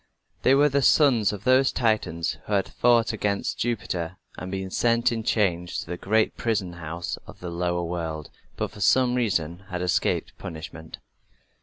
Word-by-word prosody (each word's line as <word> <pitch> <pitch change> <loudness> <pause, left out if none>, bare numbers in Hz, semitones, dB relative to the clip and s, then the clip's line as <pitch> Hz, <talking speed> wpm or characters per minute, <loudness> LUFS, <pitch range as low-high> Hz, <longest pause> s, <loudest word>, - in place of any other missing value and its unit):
They 135 - +5
were 145 +2 +5
the 140 -1 +1
sons 125 -7 +4
of 105 -3 -7
those 130 +1 +4
Titans 100 -9 0
who 105 - -2
had 100 -2 +1
fought 120 -2 +3
against 100 -1 -1
Jupiter 95 -7 -2 0.2
and 95 - -7
been 95 -1 -4
sent 120 +3 +2
in 115 -1 -2
chains 90 -6 0
to - - -4
the 90 - -4
great 110 +5 +1
prison 105 -6 -1
house 85 +1 -5
of - - -12
the 90 -1 -6
lower 85 0 -1
world, 80 -3 -4 0.3
but - - -2
for 105 - -11
some 125 +5 +4
reason 95 -7 -1
had 90 0 -3
escaped 90 - 0
punishment. 80 -1 -8
95 Hz, 170 wpm, -25 LUFS, 85-115 Hz, 0.3 s, They